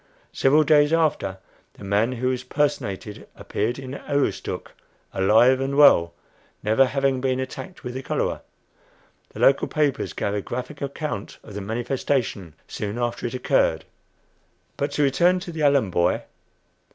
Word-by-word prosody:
Several 145 +3 +4
days 150 0 +4
after, 155 - +1 0.4
the - - -13
man 105 +5 +1
who 125 +1 -1
was 130 0 -2
"personated" 120 -8 -2
appeared 115 +4 -2
in 135 -1 -7
Aroostook, 140 0 -2 0.4
alive 115 +7 +4
and 135 +1 -2
well, 85 -12 +6 0.5
never 110 +5 +4
having 135 -1 0
been 130 -1 0
attacked 150 +8 -7
with 125 -1 -5
the 130 - -5
cholera. - - -2 0.9
The - - -11
local 135 - +4
papers 145 -3 -1
gave 100 - -2
a 105 - -1
graphic 125 +7 -6
account 140 -6 -5
of 105 - -12
the 105 - -5
"manifestation" 115 - -2
soon 105 +1 -5
after 120 0 -2
it 120 - -6
occurred. 125 - +1 0.9
But 140 - -1
to 150 - +1
return 170 +7 +3
to 175 - -7
the 160 -1 -5
Allen 140 -9 +3
boy. 85 0 +1
130 Hz, 150 wpm, -23 LUFS, 110-145 Hz, 0.9 s, well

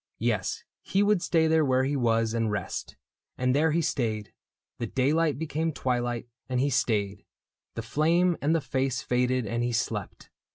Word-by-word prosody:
Yes, 110 -5 -1 0.2
he 195 +2 +1
would 205 -3 +3
stay 165 -2 +2
There 160 0 +3
where 130 -2 +2
he 140 +2 0
was 115 -3 +1
and 115 -1 0
rest. 105 - -4 0.2
— - - -58
And 125 0 +1
there 155 +3 +3
he 165 +2 +1
stayed; 110 - -2 0.5
The 120 - -2
daylight 145 +5 +1
became 160 +1 -1
twilight, 120 -3 -2 0.2
and 125 -1 0
he 140 +2 +1
stayed; 105 -6 0 0.5
The 115 - -4
flame 165 +8 +2
and 155 +3 +2
the 165 - +1
face 130 -1 -1
faded, 125 0 +1
and 115 +3 -2
be 120 0 0
slept. 115 - -3
130 Hz, 175 wpm, -27 LUFS, 115-155 Hz, 0.5 s, would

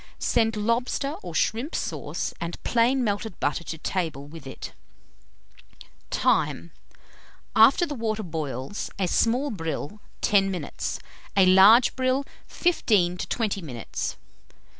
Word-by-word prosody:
Send 225 -1 +1
lobster 240 +6 0
or 175 -3 -8
shrimp 235 - 0
sauce - - -3
and 170 0 -5
plain 245 +2 +2
melted 205 -2 -2
butter 145 +3 -1
to 160 - -5
table 160 -5 -3
with 150 -1 -11
it. - - -8 1.4
Time. 85 0 +1 0.8
After 245 +10 +6
the 300 - -5
water 220 -4 -2
boils, 155 -1 -4
a 190 -2 0
small 245 +10 +1
brill, 165 +1 -5 0.2
10 195 -2 +3
minutes; 180 -6 -4 0.4
a 195 - +7
large 195 +6 +7
brill, 260 +2 +1 0.2
15 205 - +2
to - - -4
20 210 -4 -1
minutes. 125 -8 -5
205 Hz, 120 wpm, -25 LUFS, 165-235 Hz, 1.4 s, a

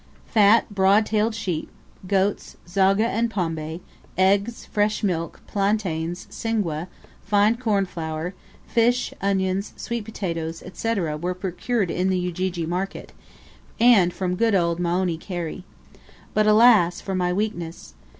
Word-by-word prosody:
Fat 215 +1 +5
broad 200 +2 +4
tailed 215 +1 0
sheep, 175 -7 -3 0.4
goats, 195 +1 0
zogga 195 +3 +3
and 235 0 0
pombe, 165 -4 -3 0.4
eggs, 200 +5 +2
fresh 210 +1 0
milk, 170 -5 -2
plantains, 185 -5 -1
singwe, 185 -8 -2 0.3
fine 205 +2 +3
cornflour, 180 -7 -2 0.3
fish, 240 +1 +1
onions, 195 0 0
sweet 235 -2 -4
potatoes, 165 -6 -4
&c., 225 - -3
&c., - - 0 0.2
were 180 +1 -2
procured 190 +2 -2
in 185 +1 0
the 185 - +1
Ujiji 180 -1 -2
market, 180 +4 -4 0.7
and 220 -7 +6
from 180 0 -2
good 225 +1 +2
old 170 -2 +1
Moeni 175 -1 0
Kheri. 175 0 -5 0.7
But, 215 0 +3
alas! 215 -5 +6
for 195 - -5
my 180 -1 0
weakness. 180 -4 -4
190 Hz, 125 wpm, -23 LUFS, 175-215 Hz, 0.7 s, and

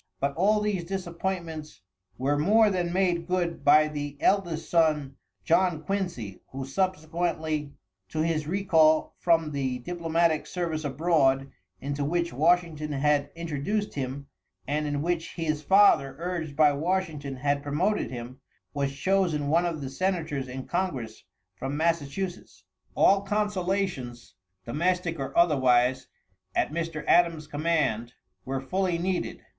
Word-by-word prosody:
But 140 0 0
all 210 +7 +2
these 205 -4 -1
disappointments 170 - -4 0.4
were 140 +3 +1
more 210 +8 +4
than 175 -2 -1
made 175 -2 +1
good 180 -2 -1
by 155 +1 +6
the 145 -1 -5
eldest 170 -5 +1
son, 150 -5 +2 0.3
John 170 -2 +2
Quincy, 170 - -3
who 135 0 -6
subsequently 160 -2 -2 0.3
to 155 - -2
his 160 -2 -1
recall 160 -4 +3
from 165 -3 +2
the 135 -3 -2
diplomatic 165 +2 0
service 165 -3 -3
abroad, 135 -2 +2 0.3
into 140 +1 -3
which 170 +3 -1
Washington 155 0 +1
had 145 0 +1
introduced 170 +6 -2
him 135 0 -4 0.4
and 150 +2 -1
in 145 0 -2
which 170 -1 -2
his 155 -3 -1
father, 190 -7 +4
urged 170 -3 -4
by 150 -1 +5
Washington, 155 -3 -2
had 140 +2 0
promoted 170 +9 0
him, 125 +1 -8 0.3
was 140 -1 -2
chosen 175 -6 +1
one 170 +3 +3
of 160 -3 -4
the 135 - -4
senators 160 -5 -1
in 130 +1 -6
congress 135 -12 -3 0.3
from 135 +9 -4
Massachusetts. 170 +3 -2 0.3
All 195 0 +5
consolations, 195 - -2 0.3
domestic 170 +4 -1
or 135 - -4
otherwise, 130 -5 +3 0.5
at - - +1
Mr. 165 -2 -3
Adam's 165 -3 +3
command, 150 -7 -1 0.3
were 135 0 -2
fully 180 +6 -1
needed. 180 +1 -2
160 Hz, 130 wpm, -27 LUFS, 140-175 Hz, 0.5 s, by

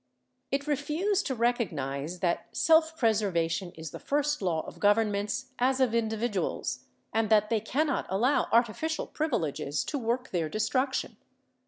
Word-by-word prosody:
It 275 +1 -1
refused 310 +8 0
to 265 - -1
recognize 175 - -1
that 175 -2 0
self 320 0 +4
preservation 190 - +1
is 160 -1 -7
the - - -8
first 295 -1 0
law 170 -4 0
of - - -10
governments 210 +4 +1
as 260 +2 +2
of 255 -4 +3
individuals, 220 -3 -1 0.3
and 225 -1 +1
that 215 0 +4
they 225 - +3
cannot 280 +6 0
allow 235 +9 +2
artificial 240 +8 +1
privileges 160 - -1
to 290 - -3
work 245 +2 -2
their 165 -4 -1
destruction. 255 - -1
230 Hz, 140 wpm, -29 LUFS, 195-275 Hz, 0.3 s, self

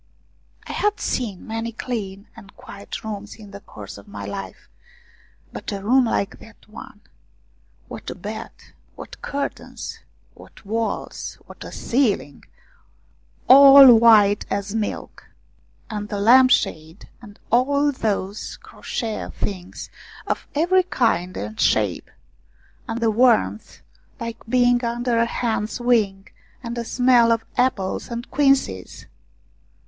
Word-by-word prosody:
I - - -7
had 420 0 0
seen 215 -7 -3
many 225 +1 -4
clean 205 -4 -6
and 200 - -15
quiet 230 -5 -9
rooms 210 -1 -7
in 210 -2 -14
the 200 - -9
course 105 - -11
of 100 - -17
my 100 0 -8
life, 95 -2 -8 0.9
but - - -6
a 200 -1 -5
room 255 +4 +4
like 200 -3 -2
that 225 - -17
one! 210 -1 -12 0.9
What - - -8
a - - -6
bed! - - -7 0.5
What - - -11
curtains! 280 0 -5 0.3
W - - -15
T - - -26
hat - - -31
walls! 225 +2 -4
What - - -12
a - - -9
ceiling! 220 - -1 1.0
All 275 -1 +10
white 220 -3 +5
as 200 0 -3
milk. 220 -2 -5 0.6
And 210 -2 -5
the 205 - -3
lamp 255 +5 +6
shade, 160 -6 -1
and 205 -3 -14
all 280 +4 +3
those 205 -5 -3
crochet 225 -3 -5
things 185 -3 -6 0.3
of - - -3
every 350 +5 +3
kind 225 - -1
and 105 +2 -6
shape! 105 -5 +1 0.8
And 225 +1 -3
the 225 -1 +2
warmth, 205 - +1 0.4
like 230 -1 -6
being 245 0 +3
under 235 0 -1
a 230 - +2
hen's 225 -1 -2
wing, 215 -6 +1 0.4
and 235 0 -5
a 235 - -4
smell 245 -1 +4
of 225 -1 0
apples 220 -7 -1
and 235 +1 -6
quinces 275 -1 0
225 Hz, 135 wpm, -22 LUFS, 200-245 Hz, 1.0 s, All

